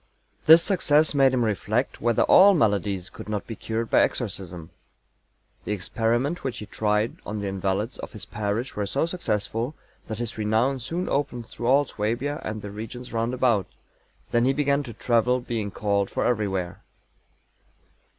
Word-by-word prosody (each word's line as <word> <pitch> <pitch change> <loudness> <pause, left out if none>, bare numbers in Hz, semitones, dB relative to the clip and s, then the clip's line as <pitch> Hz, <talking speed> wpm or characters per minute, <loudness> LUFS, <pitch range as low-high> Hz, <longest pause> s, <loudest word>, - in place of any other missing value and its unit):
"This 165 +2 +9
success 155 -6 +3
made 135 -2 +5
him 125 -2 +1
reflect 110 +4 -1
whether 120 -1 +3
all 195 +1 +7
maladies 100 - +1
could - - -10
not 105 -1 -2
be 115 - -6
cured 115 +2 -3
by - - +6
exorcism... 90 -7 -3 0.9
The - - -2
experiment 115 - -1
which 130 -3 -3
he 105 - -6
tried 105 +1 0
on 105 0 -4
the 100 - -3
invalids 95 +4 -2
of - - -8
his 105 - -6
parish 105 +4 -3
were 105 -1 -2
so 100 - 0
successful 120 - -2 0.3
that 110 - -4
his 115 -1 -4
renown 110 +6 +1
soon 170 +9 -3
opened 135 -4 -1
through 120 +1 -5
all 140 +3 +5
Suabia, 125 +7 -2
and 110 -1 -5
the 105 - -6
regions 115 +4 -8
roundabout. 115 -3 +1 0.6
Then 120 +1 +3
he 135 - +3
began 140 0 +1
to 120 - -8
travel, 125 +2 +2
being 115 -4 -3
called 100 0 0
for - - -1
everywhere." 95 -6 -1
115 Hz, 160 wpm, -25 LUFS, 105-130 Hz, 0.9 s, This